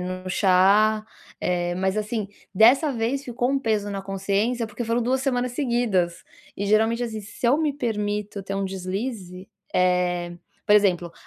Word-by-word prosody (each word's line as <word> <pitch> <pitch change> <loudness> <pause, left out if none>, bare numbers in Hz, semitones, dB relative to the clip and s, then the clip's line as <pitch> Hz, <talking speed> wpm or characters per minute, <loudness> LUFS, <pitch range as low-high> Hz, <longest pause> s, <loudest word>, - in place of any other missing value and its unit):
no 185 +1 -5
chá, 200 +4 +3 0.4
eh, 175 -1 -1
mas 190 +2 0
assim, 215 0 -2 0.3
dessa 245 - +5
vez 245 +3 -1
ficou 245 0 -1
um 275 0 +1
peso 215 -4 0
na 200 -1 -4
consciência, 200 +5 -1
porque 215 +2 -6
foram 230 +1 0
2 255 +3 0
semanas 250 -2 -1
seguidas, 235 - 0 0.3
e 200 - -3
geralmente 225 +3 +2
assim, 220 -2 -5
se 205 +4 -5
eu 250 +4 +4
me 310 -2 +1
permito 210 -5 -3
ter 195 +1 -4
um 195 - -1
deslize, 190 0 -5 0.2
eh, 180 -1 +1 0.3
por 210 - +5
exemplo, 180 -5 +2
210 Hz, 160 wpm, -24 LUFS, 190-235 Hz, 0.4 s, dessa